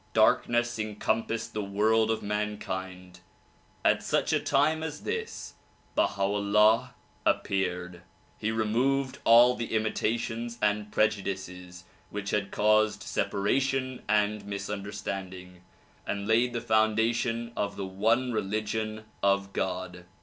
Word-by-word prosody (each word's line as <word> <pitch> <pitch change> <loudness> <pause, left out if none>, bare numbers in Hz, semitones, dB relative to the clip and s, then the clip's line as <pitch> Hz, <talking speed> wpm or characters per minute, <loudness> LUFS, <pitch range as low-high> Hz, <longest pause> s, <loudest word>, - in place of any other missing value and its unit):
Darkness 120 +2 +3
encompassed 110 +2 -2
the 105 - -2
world 110 +3 +2
of 110 - -1
mankind. 95 -3 -4 0.7
At - - +4
such - - 0
a - - +3
time 155 +3 +2
as 150 -2 -5
this, 455 0 -4 0.4
Baha 100 - +1
'Ullah 105 +5 +3 0.3
appeared. 90 -2 -1 0.4
He 110 - -1
removed 130 +5 0
all 120 +2 +7
the 115 -2 -4
imitations 115 +2 -1
and 105 -1 0
prejudices 95 -4 -2 0.3
which 100 -1 -4
had 100 -1 0
caused 105 -1 +2
separation 130 +8 0
and 105 0 +2
misunderstanding, 100 -2 -6 0.5
and 100 0 -3
laid 120 +2 +3
the 120 - -2
foundation 115 +2 +1
of 100 -1 -2
the 100 - -4
one 110 +7 +1
religion 110 +1 -2 0.2
of 100 0 +1
God. 90 -1 -3
105 Hz, 115 wpm, -28 LUFS, 100-115 Hz, 0.7 s, all